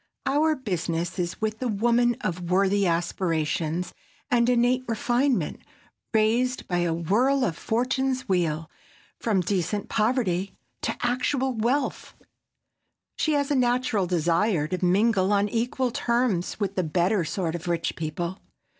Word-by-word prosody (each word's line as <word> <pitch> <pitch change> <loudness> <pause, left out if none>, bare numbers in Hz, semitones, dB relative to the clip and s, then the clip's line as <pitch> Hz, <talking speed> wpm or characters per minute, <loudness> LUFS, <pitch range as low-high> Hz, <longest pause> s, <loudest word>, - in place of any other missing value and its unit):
Our 300 +3 +2
business 175 - -3
is 175 0 -2
with 220 0 -2
the 255 - -1
woman 240 +2 +2
of 175 -1 -3
worthy 195 +1 +3
aspirations 165 -1 -1 0.4
and 240 -1 +3
innate 250 +1 +3
refinement, 240 +4 0 0.5
raised 235 +4 +1
by 175 -1 0
a 175 -1 +1
whirl 235 - +2
of 165 - -1
fortune's 255 +4 -1
wheel 165 -5 0 0.5
from 210 -5 +1
decent 185 +2 -1
poverty 210 -5 0 0.3
to - - -2
actual 255 +2 0
wealth. 245 +5 -1 1.0
She 310 - +2
has 285 -1 0
a - - +3
natural 245 -6 +1
desire 170 0 +1
to 185 +1 -3
mingle 195 +1 +3
on 205 0 +3
equal 245 +3 -1
terms 235 -8 0
with 200 -2 -1
the 185 - +1
better 180 +4 +1
sort 165 +1 -2
of 175 0 -6
rich 170 -1 -1
people. 170 +4 -4
205 Hz, 135 wpm, -26 LUFS, 175-245 Hz, 1.0 s, worthy